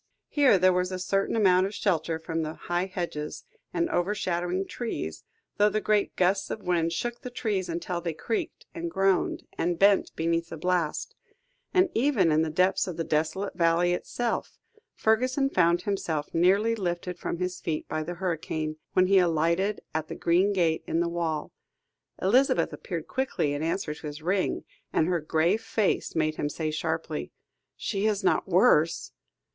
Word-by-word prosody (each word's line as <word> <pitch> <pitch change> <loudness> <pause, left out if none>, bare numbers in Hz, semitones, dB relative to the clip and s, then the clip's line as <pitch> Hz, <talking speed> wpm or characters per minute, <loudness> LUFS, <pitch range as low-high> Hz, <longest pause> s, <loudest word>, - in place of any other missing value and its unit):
Here 280 -8 +5
there 185 0 +4
was 180 +1 0
a 185 - -2
certain 195 +3 0
amount 190 -3 +4
of 200 - -8
shelter 165 -4 0
from 165 0 -3
the 155 0 -4
high 175 +2 -2
hedges 170 -5 -4 0.3
and 170 -1 0
overshadowing 180 -1 0
trees, 80 - -5 0.3
though 210 +1 +5
the 215 - 0
great 210 -1 +1
gusts 190 +2 +2
of 220 - -5
wind 170 -2 +1
shook 240 +7 -3
the 250 - -6
trees 210 -7 -2
until 170 +1 -3
they 165 -2 -3
creaked, 230 - -3
and 335 0 -4
groaned, 195 - +1 0.2
and 175 0 0
bent 200 +2 +4
beneath 165 +1 0
the - - -6
blast; 175 -1 -1 0.6
and 370 0 +4
even 225 - +3
in 155 +1 +3
the 160 - 0
depths 185 +5 +2
of 180 - -5
the 165 - -1
desolate 160 +5 -1
valley 170 +1 +3
itself, 235 +6 -3 0.4
Fergusson 255 +5 +2
found 175 0 +3
himself 165 -7 -2
nearly 195 +7 +3
lifted 180 -3 -3
from - - -3
his 180 +1 -3
feet 155 -2 -3
by 155 - -2
the 175 +3 -5
hurricane, 160 -3 -3 0.2
when 185 - +5
he 195 +1 +5
alighted 170 +4 +1
at 160 0 -2
the - - -6
green 180 +4 +2
gate 170 -5 +1
in 165 - 0
the 170 - +1
wall. 165 -3 -2 0.7
Elizabeth 250 +9 +3
appeared - - -5
quickly 260 - -1
in 145 - -3
answer 165 0 -1
to 150 0 -8
his 150 +1 -8
ring, 185 +3 0 0.3
and 160 - +2
her 175 -1 +1
grave 160 +7 +1
face 220 -2 0
made 155 -1 0
him 145 - -1
say 155 +1 -3
sharply 160 0 -3 0.4
"She 205 0 -1
is 210 -1 0
not 190 - +2
worse?" 175 -4 +3
180 Hz, 175 wpm, -27 LUFS, 165-200 Hz, 0.7 s, Here